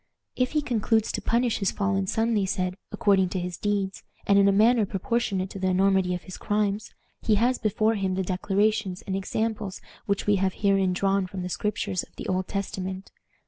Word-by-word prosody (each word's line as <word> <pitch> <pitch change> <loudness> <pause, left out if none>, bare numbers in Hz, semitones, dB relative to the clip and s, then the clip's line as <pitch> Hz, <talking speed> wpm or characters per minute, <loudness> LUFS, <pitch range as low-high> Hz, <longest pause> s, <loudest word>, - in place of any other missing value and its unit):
"If 255 +2 0
he 300 -1 +1
concludes 225 -3 +1
to - - -3
punish 235 0 +1
his 195 -3 +1
fallen 195 -1 0
son," 225 +4 +1
they 200 -3 +1
said, 185 -1 -1 0.2
"according 195 -3 +3
to 185 - -2
his 180 0 -4
deeds, 200 -1 -2 0.2
and 200 0 +5
in 200 - +5
a - - +5
manner 220 +3 +4
proportionate 195 -1 -1
to 195 - -7
the 185 - 0
enormity 190 -1 +2
of 180 - -7
his 185 - -9
crimes, 205 0 -1 0.3
he 215 - +2
has 245 +5 +2
before 215 +1 +1
him 190 -3 -1
the 190 - 0
declarations 195 +2 0
and 190 - -3
examples 210 0 -2 0.3
which 200 -1 0
we 205 -1 +3
have 190 0 +1
herein 195 -3 +2
drawn 195 0 +1
from 185 0 -6
the 180 - -4
Scriptures 200 -2 -1
of - - -15
the - - -7
Old 185 0 -1
Testament. 190 -1 -4
195 Hz, 200 wpm, -26 LUFS, 190-215 Hz, 0.3 s, and